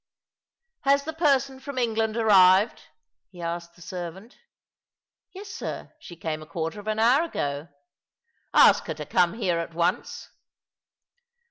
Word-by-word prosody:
"Has 280 -1 +2
the 320 +2 -5
person 275 -4 +1
from 275 0 -8
England 225 -2 0
arrived?" 195 -2 +5 0.5
he 180 - -15
asked 170 0 -5
the 175 - -14
servant. 185 +6 -8 0.5
" - - -68
Yes, 400 +2 -9
sir. - - -6
She 175 - -11
came 160 -2 -4
a 155 - -11
quarter 165 +5 -4
of 205 - -11
an 215 0 -1
hour 240 +6 +4
ago." 145 - -3 0.4
" 465 0 -47
Ask - - +6
her - - -3
to - - -7
come 175 -1 +2
here 180 -7 0
at 165 0 -6
once." 170 0 -2
205 Hz, 150 wpm, -25 LUFS, 170-260 Hz, 0.5 s, Ask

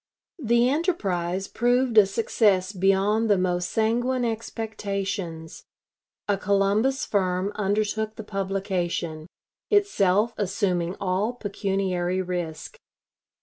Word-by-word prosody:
The 235 +1 +3
enterprise 195 - -1
proved 245 +1 +1
a 210 -3 +7
success 200 -2 +1
beyond 195 +3 +2
the 205 - +5
most 180 -1 0
sanguine 240 +3 +1
expectations. 200 -7 -4 0.6
A 200 -2 +1
Columbus 200 +7 +1
firm 185 -1 0
undertook 215 +1 -1
the 220 - -7
publication, 190 -5 -3 0.4
itself 230 - +2
assuming 185 -3 -1
all 195 +5 0
pecuniary 195 -4 -2
risk. 175 -3 -4
200 Hz, 95 wpm, -25 LUFS, 185-225 Hz, 0.6 s, a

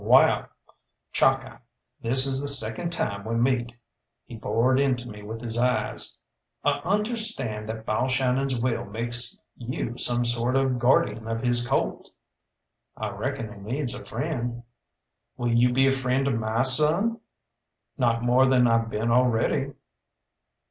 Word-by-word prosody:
"Wall, - - +4 0.7
Chalkeye, - - +1 0.4
this 130 +3 +4
is 135 0 +2
the 145 - -3
second 130 +3 +4
time 100 -12 -3
we 115 +2 -3
meet," 120 0 0 0.5
he 120 - -10
bored 115 +5 +1
into 130 -3 0
me 105 -2 -10
with 110 +2 -7
his 120 -1 -1
eyes; 125 +1 0 0.5
"I - - +1
understand 205 - -2
that 110 0 -6
Balshannon's 130 +3 0
will 115 0 -1
makes 120 +3 0 0.2
you 120 0 -5
some 120 0 0
sort 120 +2 0
of 135 -2 +1
guardian 115 -2 +1
of 115 +1 -3
his 120 -1 +2
colt." - - -2 0.9
"I - - -4
reckon 110 -2 -5
he 100 - -13
needs 125 +5 -3
a 125 - -8
friend." 120 -6 -4 0.7
"Will 120 -1 -1
you 120 +1 +3
be 135 +2 +3
a 135 - +4
friend 135 0 0
to 140 - +1
my 115 +1 -1
son?" 155 - +4 0.8
"Not 120 -3 0
more 125 +2 +4
than 130 -2 +4
I 115 0 +3
been 115 0 -2
already." 120 -2 +1
120 Hz, 145 wpm, -25 LUFS, 115-130 Hz, 0.9 s, Wall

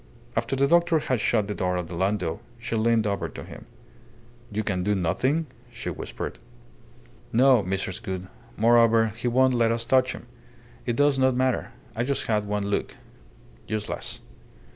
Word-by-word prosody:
After - - 0
the 135 +1 +3
doctor 170 +1 +4
had 130 -5 0
shut 105 -1 +1
the 105 - -2
door 90 -2 -1
of 90 -1 -3
the 85 - -8
landau, 95 -1 -1 0.2
she 115 -1 -4
leaned 115 0 +2
over 100 -1 -1
to - - -8
him. - - -11 0.8
"You 110 +1 -1
can 95 -4 -1
do 105 +2 +1
nothing?" 130 - +1 0.3
she 120 - -5
whispered. - - -6 0.9
"No, 125 0 +5
Mrs. 95 -1 -2
Gould. 95 -1 -4 0.3
Moreover, 115 0 +5
he 120 +2 -3
won't 130 +2 +4
let 115 -2 +3
us 115 0 -1
touch 130 +2 +3
him. - - -10 0.6
It 120 - +1
does 145 0 +3
not 130 -1 +3
matter. 130 0 0 0.2
I 115 - 0
just 140 +2 -1
had 105 -2 0
one 105 -1 -1
look.... 100 0 -2 0.7
Useless." 110 -1 -4
115 Hz, 165 wpm, -26 LUFS, 100-130 Hz, 0.9 s, No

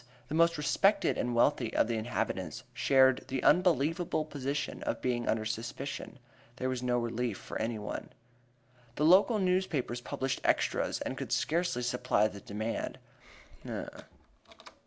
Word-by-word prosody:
The - - -4
most 165 0 +4
respected 195 +6 +2
and 120 -1 -1
wealthy 120 -1 +2
of - - +3
the 120 - -1
inhabitants 110 +2 -3
shared 130 -1 +4
the 130 -1 -2
unenviable 165 -1 +2
position 140 -1 -3
of - - -2
being 120 -2 -1
under 110 -1 0
suspicion; 115 +5 -5 0.4
there 130 0 -2
was 130 -1 -2
no 125 -1 +1
relief 120 -2 -2
for - - -6
anyone. 110 -2 -4 0.9
The 150 - -1
two 155 - +6
local 205 +5 +6
newspapers 180 - 0
published 135 +2 -3
"extras," - - +1
and - - -4
could - - -5
scarcely 165 -6 0
supply 125 -4 +2
the 100 -2 -9
demand. 110 +4 -4
130 Hz, 135 wpm, -31 LUFS, 120-155 Hz, 0.9 s, two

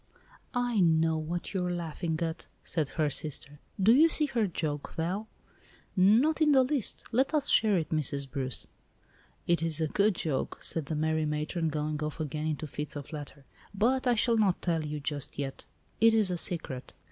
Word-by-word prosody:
"I 245 -3 +1
know 160 -2 +4
what 170 +4 -4
you 190 -2 0
are 180 - -1
laughing 165 -1 -2
at," 165 0 -4 0.2
said 155 -5 -2
her 155 -2 +3
sister. 145 0 -5 0.2
"Do 205 +4 +6
you 315 +6 +6
see 305 -1 +1
her 235 -7 0
joke, 150 -4 -3
Val?" 185 +7 -2 0.7
"Not 230 - +4
in 300 -2 +5
the 265 -1 +6
least. 265 -3 -2
Let 265 +6 +2
us 290 -2 +1
share 215 -3 +4
it, 160 - -2
Mrs. 140 -3 -1
Bruce." 130 0 -3 0.8
"It 170 -1 +2
is 165 -2 -1
a 160 - +2
good 200 +5 +2
joke," 155 -5 -2
said 160 -4 -3
that 155 - -2
merry 155 0 +1
matron, 155 +2 -1
going 150 0 -2
off 150 +1 -3
again 155 0 -2
into 155 0 -2
fits 150 +1 -5
of 145 +2 -7
laughter; 145 -2 -8 0.3
"but 250 +6 +2
I 245 - +4
shall 230 +1 +2
not 200 -4 +3
tell 165 -3 +1
you 150 0 -3
just 145 -1 -2
yet. 135 -1 -4 0.3
It 225 0 +6
is 210 -4 +3
a - - 0
secret." 160 -7 -4
165 Hz, 190 wpm, -30 LUFS, 150-215 Hz, 0.8 s, Do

